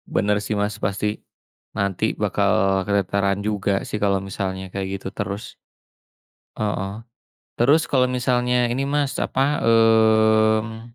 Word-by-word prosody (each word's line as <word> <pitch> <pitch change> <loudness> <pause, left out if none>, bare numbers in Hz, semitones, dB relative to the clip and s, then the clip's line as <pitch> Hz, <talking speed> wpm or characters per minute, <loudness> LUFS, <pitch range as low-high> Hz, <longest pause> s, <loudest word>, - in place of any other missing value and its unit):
Bener 105 0 +2
sih 105 - -3
Mas 105 0 -1
pasti, 105 +1 -2 0.6
nanti 100 -2 0
bakal - - +1 0.4
keteteran 100 0 0
juga 105 -2 -1 0.2
sih - - -3
kalau 100 -1 +2
misalnya 95 -1 -4
kayak 95 -1 -3
gitu - - -8
terus, 100 0 -6 1.0
heeh, 105 -2 -2 0.7
terus 140 +7 +4
kalau 130 -2 +3
misalnya 125 -1 +1
ini 130 +3 -1
Mas 145 -2 0
apa 135 - -2 0.2
mmm 110 -1 +3
105 Hz, 120 wpm, -22 LUFS, 100-115 Hz, 1.0 s, terus